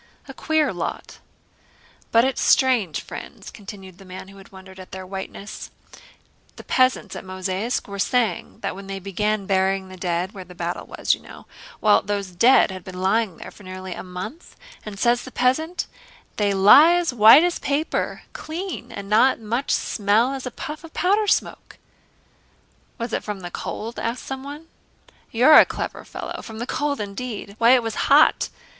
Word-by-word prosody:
A 270 - -9
queer 315 +2 0
lot!" - - -5 0.9
"But 230 +2 +5
it's 265 -1 -1
strange, 235 - +3
friends," - - -10
continued 195 -3 -11
the - - -12
man 185 0 -10
who 195 - -15
had 195 - -15
wondered 190 0 -13
at 185 - -11
their 190 0 -7
whiteness, 195 +2 -7 0.9
"the - - -11
peasants 255 0 +1
at - - -7
Mozháysk 185 +4 -3
were 200 -1 -7
saying 225 -3 -1
that - - -3
when 195 0 -10
they 195 0 -5
began 200 +2 -2
burying 190 0 0
the 185 - -11
dead—where 180 +2 -3
the 180 0 -14
battle 175 0 -4
was - - 0
you - - -5
know—well, 345 - -1
those 200 -2 -3
dead 230 +5 +5
had 185 -1 -8
been 185 -1 -9
lying 195 0 +1
there - - -9
for - - -17
nearly 185 -1 -7
a - - -7
month, 185 - -8 0.3
and 210 -2 -8
says 240 +3 +2
the 260 - -10
peasant, 315 +9 0 0.5
'they 205 -1 +1
lie 280 - +8
as 350 -6 0
white 230 +6 +8
as 350 -1 0
paper, 290 +3 -2
clean, 315 -6 -6
and 200 -3 -7
not 220 +6 +4
as - - -17
much 235 +6 -2
smell 220 +5 +1
as 265 -1 -5
a - - -2
puff 300 +6 -7
of 330 - -13
powder 410 +4 +2
smoke.'" - - -1 1.2
"Was 235 -2 -5
it - - -1
from 205 -2 -5
the 175 -1 -7
cold?" 225 +6 -5
asked 235 +2 -3
someone. 280 +4 -7 0.6
"You're 255 +7 +7
a - - +9
clever - - -5
fellow! - - -7
From 220 -1 -10
the 235 - -4
cold 290 +2 -2
indeed! 205 0 -6
Why, 235 +2 +6
it 245 - +1
was 225 -1 -3 0.2
hot. 290 +2 +5
215 Hz, 175 wpm, -23 LUFS, 190-260 Hz, 1.2 s, a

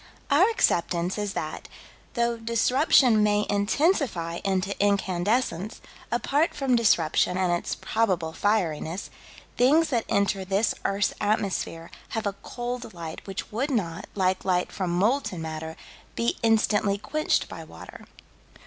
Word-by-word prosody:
Our 345 +10 +5
acceptance 175 - +1
is 205 -1 -2
that, 155 -1 -5 0.5
though 235 -1 +1
disruption 235 +1 +3
may 210 0 +2
intensify 205 - +1
into 195 0 0
incandescence, 200 0 0 0.3
apart 285 +7 +1
from 270 -4 +1
disruption 180 -5 +2
and 185 -2 +1
its 175 - -2
probable 185 -8 -1
fieriness, 180 -4 -1 0.5
things 300 +7 +4
that 235 -5 0
enter 200 -1 +1
this 195 +3 +1
earth's 195 0 +1
atmosphere 200 -5 -1 0.3
have 220 - -2
a 200 - 0
cold 240 -3 -5
light 165 +1 -8
which 195 -1 -6
would 250 +7 -1
not, 185 - -2
like 185 -1 +1
light 180 -1 0
from 185 -3 -3
molten 195 +2 +1
matter, 160 0 -5 0.4
be 235 - 0
instantly 215 -3 +2
quenched 305 +9 0
by - - -8
water. - - -12
205 Hz, 130 wpm, -26 LUFS, 180-235 Hz, 0.5 s, Our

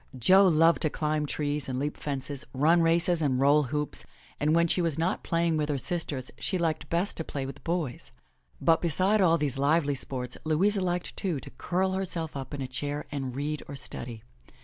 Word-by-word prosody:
Jo 190 - +6
loved 165 0 +4
to 155 - +2
climb 150 0 -1
trees 145 -1 -2
and 130 - -2
leap 145 +3 -2
fences, 140 -1 -4
run 160 +6 +4
races 165 +1 +3
and 135 -4 +1
roll 145 +2 +4
hoops, 150 +3 -3 0.4
and 155 +2 +2
when 170 0 +4
she 180 - +1
was 165 -3 0
not 165 +3 0
playing 165 -1 +1
with 150 0 -1
her 145 - 0
sisters 140 -3 -3
she 185 +10 -1
liked 165 -3 -1
best 175 +4 0
to 160 - -2
play 140 -3 -4
with 135 - -8
boys. 165 -7 -3 0.5
But 165 - +3
beside 185 +6 +2
all 170 -3 +5
these 140 -4 -2
lively 145 +1 +2
sports, 125 -2 -3
Louisa 190 +6 +2
liked, 180 -1 -2
too, 180 -8 -2
to - - -10
curl 185 +2 -1
herself 175 -5 -3
up 135 -2 -6
in 140 -2 -4
a - - -4
chair 145 +3 -3
and 135 -3 -4
read 150 +2 -2
or 140 - -7
study. 120 -3 -5
155 Hz, 200 wpm, -28 LUFS, 140-170 Hz, 0.5 s, Jo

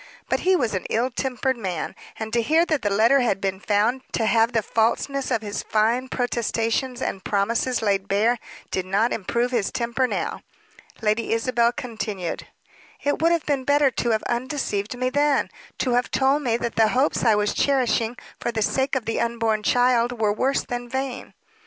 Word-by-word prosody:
But - - +1
he 375 +1 +3
was 240 -10 0
an 185 - -3
ill 245 +4 0
tempered 260 0 -1
man; 185 -7 -3 0.2
and 220 0 -5
to 235 - +3
hear 320 +8 +3
that 310 -6 0
the 205 - 0
letter 225 +7 +4
had 235 -6 +1
been 190 -1 -2
found 210 +6 +1
to 225 - +1
have 225 +1 +3
the 225 -3 +1
falseness 245 +6 0
of 230 -4 0
his 205 -1 -3
fine 230 +4 +1
protestations 245 +1 -1
and 190 - -3
promises 230 +4 0
laid 200 -2 +1
bare, 220 +5 +2 0.3
did 185 - -1
not 205 +5 +1
improve 235 +4 -1
his 230 -6 0
temper 240 +2 0
now. - - -3 0.6
Lady 215 +1 +1
Isabel 235 +1 +2
continued, 220 - -5 0.6
"It 285 +2 0
would 330 +1 +4
have 335 -2 +1
been 280 -3 0
better 285 0 +3
to 240 - -1
have 220 -1 +1
undeceived 240 -3 -2
me 255 +1 -1
then; 290 0 +2 0.3
to 255 - 0
have 245 +1 +1
told 270 +2 +2
me 235 -5 +1
that 235 -1 -4
the 225 -1 +5
hopes 275 +3 +2
I 225 -3 +5
was 210 0 +1
cherishing 245 -4 +1 0.2
for 240 - -2
the 220 -2 0
sake 265 +5 0
of 255 -4 -1
the 225 - -1
unborn 230 -2 0
child 245 +1 +2
were 210 -2 +2
worse 265 +6 +1
than 245 0 -5
vain." 265 0 -4
235 Hz, 190 wpm, -23 LUFS, 220-260 Hz, 0.6 s, the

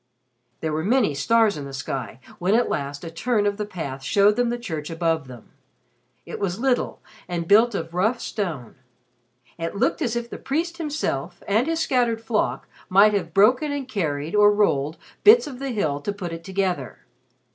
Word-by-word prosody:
There 160 -1 -2
were 155 +1 -1
many 220 - +2
stars 220 +7 +2
in 145 - -6
the 135 - -8
sky 130 -3 -5 0.2
when 185 +4 +2
at 240 - +2
last 140 +1 -3
a 165 - -6
turn 215 +4 0
of 205 0 0
the 210 -1 -3
path 145 -9 -6
showed 200 +9 +3
them 245 0 +1
the 240 - -1
church 160 -10 -5
above 165 -3 -1
them. 125 -3 -13 0.7
It - - -7
was 190 -2 -1
little 255 0 0 0.3
and 170 -1 -3
built 220 +3 +5
of 165 -2 -4
rough 220 +7 +1
stone. 155 - -4 0.8
It 165 +4 -3
looked 250 +10 0
as 240 -5 0
if 235 0 -2
the - - -8
priest 335 +5 -2
himself 185 - -3
and 220 +7 +2
his 330 0 0
scattered 245 -7 +1
flock 225 -1 -1 0.2
might 200 +3 +6
have 175 -5 -1
broken 250 - +4
and 285 -2 -3
carried 155 - -2
or 210 0 +6
rolled 160 -8 +1 0.3
bits 440 +4 +8
of 265 -4 -8
the 275 0 -3
hill 155 - -1
to 205 - -2
put 185 -4 -6
it 165 0 -7
together. 185 -8 -2
200 Hz, 190 wpm, -23 LUFS, 160-235 Hz, 0.8 s, bits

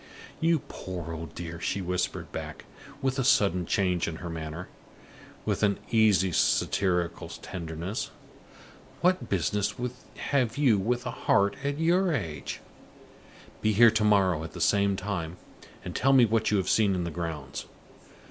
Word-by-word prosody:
"You 165 -2 +2
poor 85 -3 -6
old 80 -2 -7
dear!" 85 -1 -6
she 100 - -1
whispered 90 -1 -2
back, - - -7 0.4
with 135 0 0
a - - +2
sudden 90 -8 +3
change 90 -4 +1
in 85 - -3
her 85 +1 -6
manner, 80 +2 -6 0.8
with - - 0
an 100 -2 +3
easy 105 -5 +4
satirical 90 -1 +1
tenderness. 85 +4 -5 0.9
"What 180 +1 +2
business 100 +2 0 0.6
have 125 -5 +1
you 125 -8 +4
with 120 +5 -1
a 120 - -2
heart 100 -3 +2
at 140 0 -1
your 175 +3 +3
age? 80 - -4 1.0
Be 110 0 +2
here 115 +2 +7
to 110 0 +1
morrow 95 -6 +3
at 80 - -8
the - - -8
same 100 -1 +3
time, 90 -3 -4 0.5
and 90 - -6
tell 135 +1 +3
me 130 -3 +7
what 110 0 +1
you 105 - +2
have 95 - -1
seen 100 -3 +3
in 90 - -1
the 85 - -3
grounds. 80 -5 -5
95 Hz, 155 wpm, -28 LUFS, 85-115 Hz, 1.0 s, here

